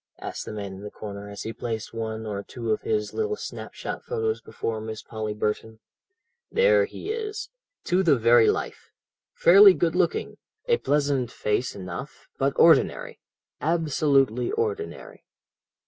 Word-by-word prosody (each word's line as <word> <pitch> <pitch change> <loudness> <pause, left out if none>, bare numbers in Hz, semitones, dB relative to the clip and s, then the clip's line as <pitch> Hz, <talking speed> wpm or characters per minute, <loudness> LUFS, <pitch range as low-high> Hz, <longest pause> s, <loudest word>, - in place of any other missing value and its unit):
asked - - -6
the - - -6
man 100 -2 -5
in 95 - -10
the 105 - -6
corner 100 -1 -8
as 100 -1 -7
he 110 - -5
placed 110 -1 -5
one 110 -1 -4
or 100 -2 -3
two 100 - -5
of 435 - 0
his 430 0 -1
little 435 -1 -1
snap - - -7
shot - - -5
photos 445 -2 -2
before 110 -1 -4
Miss 110 0 -6
Polly 110 -2 -4
Burton. 105 +1 -2 0.7
"There 480 0 +4
he 425 -1 -6
is, 430 -1 -4 0.3
to 180 +2 +2
the 170 -6 +4
very 115 0 +5
life. - - -3 0.5
Fairly 195 +2 +8
good 170 -2 +1
looking, 180 -2 0 0.3
a 475 -1 +3
pleasant 140 - +1
face 105 +4 -1
enough, 95 +8 -8
but 135 +1 +2
ordinary, 165 -1 +4 0.4
absolutely 145 -6 +2
ordinary. 435 +2 -4
135 Hz, 150 wpm, -25 LUFS, -, 0.7 s, Fairly